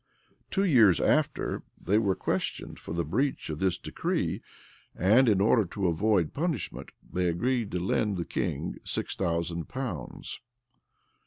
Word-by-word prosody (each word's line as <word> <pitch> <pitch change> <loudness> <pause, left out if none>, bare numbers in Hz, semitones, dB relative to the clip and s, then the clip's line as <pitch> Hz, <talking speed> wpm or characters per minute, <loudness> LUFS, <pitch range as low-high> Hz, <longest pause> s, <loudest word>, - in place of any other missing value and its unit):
[*] - - -38
Two 195 - +1
years 115 - +6
after, - - +1 0.2
they 105 +5 +2
were 100 -4 +1
questioned - - -2
for - - -9
the 85 0 -1
breach 125 - -1
of 75 - -5
this 95 -2 +1
decree; - - -2 0.5
and 115 +8 +5
in 100 -3 +3
order 110 +3 +4
to 95 +2 -4
avoid 90 0 +2
punishment, 155 - -2 0.2
they 90 0 +1
agreed 115 +6 0
to 90 - -2
lend 100 +2 0
the 85 - -2
king - - -3
six - - -3
thousand 85 -2 -1
pounds. 125 - -5
95 Hz, 150 wpm, -28 LUFS, 85-115 Hz, 0.5 s, years